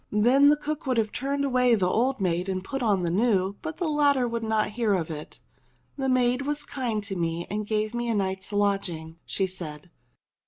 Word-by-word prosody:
Then 250 +7 +5
the 295 - +4
cook 300 -1 -4
would 255 -2 +1
have 215 -2 +1
turned 280 +2 -1
away 250 -3 +3
the 195 -4 +1
old 250 +7 +1
maid 180 0 0
and 185 -1 -2
put 270 +7 -4
on 205 -6 +2
the 170 - 0
new, 200 -1 +1
but 315 -1 -5
the 355 - -1
latter 285 -4 +3
would 235 0 -3
not 220 -1 0
hear 215 -2 +1
of 165 -3 -2
it. 150 -1 -8 0.6
"The 270 -1 -1
maid 250 0 +2
was 295 +1 -2
kind 235 -6 -3
to 195 -1 -4
me 170 -1 -2
and 210 0 -2
gave 215 0 -1
me 240 0 -2
a 230 - +1
night's 190 0 -2
lodging," 195 -6 -1
she 195 - 0
said. 170 -3 -7
215 Hz, 210 wpm, -26 LUFS, 190-255 Hz, 0.6 s, Then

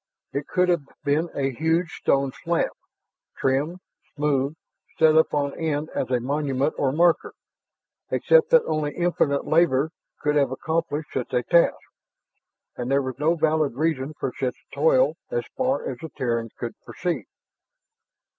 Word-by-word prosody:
It 140 +1 -3
could 180 0 +2
have 175 -3 +3 0.2
been 155 +4 +1
a 135 -1 0
huge 160 +5 0
stone 135 -1 +2
slab, 170 0 +1 0.7
trimmed, 145 +7 0 0.3
smoothed, 145 -1 0 0.4
set 160 -1 +5
up 160 - +4
on 140 -1 0
end 155 -1 -1
as - - -2
a 125 -1 +2
monument 140 +2 0
or 135 -2 +2
marker, 170 +3 +2 0.7
except 485 -1 +4
that - - +6
only 150 -2 -1
infinite 170 -5 +1
labor 155 -2 +3 0.3
could 150 0 +1
have 140 -3 +3
accomplished 160 +2 -2
such 125 - -3
a 125 - +2
task, 170 +6 +4 1.0
and 120 0 -4
there 140 0 +2
was 130 -1 -5
no 160 +3 +3
valid 155 -4 +1
reason 155 -1 -1
for 125 - -2
such 130 -2 -1 0.2
toil - - +3
as 485 -1 -1
far 260 +1 0
as 125 -2 -5
the 160 - -7
Terrans 115 -4 -2
could 120 - -4
perceive. 175 -1 -3
150 Hz, 150 wpm, -24 LUFS, 135-165 Hz, 1.0 s, that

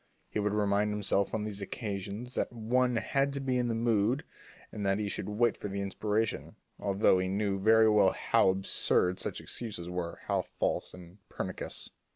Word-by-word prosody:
He - - -1
would 105 0 0
tell 100 -1 +2
himself 105 -1 +1
on 110 - -2
these 105 -1 -5
occasions 100 +3 -4
that - - -1
one 120 +2 +1
had 135 +4 +1
to 140 - -3
be 130 -2 0
in 120 - +1
the 115 - 0
mood 115 +3 +2 0.5
and 105 - -5
that 95 0 +2
he 105 -1 -2
should 100 - -3
wait 115 +2 +2
for - - -6
the 100 0 -4
inspiration, 105 +2 -1 0.2
although 100 -1 +3
he 95 - 0
knew 100 0 0
very 110 +2 +6
well 105 -3 +5
how - - +3
absurd 95 -1 +1
such - - -3
excuses 95 -7 -6
were, 90 -1 -4
how - - +1
false - - -2
and 90 +2 -13
how - - -22
pernicious. - - -4
105 Hz, 190 wpm, -31 LUFS, 100-115 Hz, 0.5 s, very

